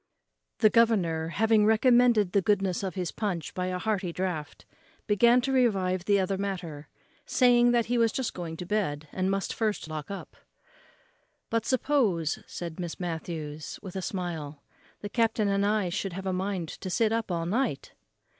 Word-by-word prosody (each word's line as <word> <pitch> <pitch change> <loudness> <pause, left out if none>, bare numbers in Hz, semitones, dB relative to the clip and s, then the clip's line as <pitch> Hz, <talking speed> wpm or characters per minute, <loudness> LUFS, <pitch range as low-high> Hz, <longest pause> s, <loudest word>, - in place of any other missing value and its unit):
The 215 -2 +4
governor, 185 -9 +3
having 215 +5 +3
recommended 220 -2 +4
the 200 - +3
goodness 195 -2 +1
of 190 -2 -4
his 180 -3 -2
punch 185 -8 -3
by 180 0 -2
a 185 0 -2
hearty 195 -3 -1
draught, 170 -4 -4 0.4
began 235 +4 +4
to 270 +2 -1
revive 190 -8 +1
the 200 -1 +3
other 190 0 -1
matter, 175 -7 -4 0.4
saying 245 -1 +5
that 240 -1 +3
he 240 +1 0
was 230 -1 +3
just 260 0 -2
going 165 -2 -6
to 180 - -6
bed, 165 -7 -1
and 185 0 -1
must 195 -1 -1
first 215 -6 -1
lock 155 -2 -6
up. 200 - -7 1.2
"But 230 0 0
suppose," 235 - +1
said 170 0 -7
Miss 175 -2 -5
Matthews, 160 -3 -5
with 190 -2 -8
a 190 - -2
smile, 160 -6 -5 0.4
"the 205 - -4
captain 225 -1 +1
and 200 0 +1
I 205 -2 +1
should 190 0 -3
have 190 +2 -6
a 190 - -1
mind 185 -2 -2
to 190 - -7
sit 220 +4 +2
up 225 -1 -1
all 165 -1 -1
night." 215 - -1
195 Hz, 175 wpm, -28 LUFS, 175-220 Hz, 1.2 s, saying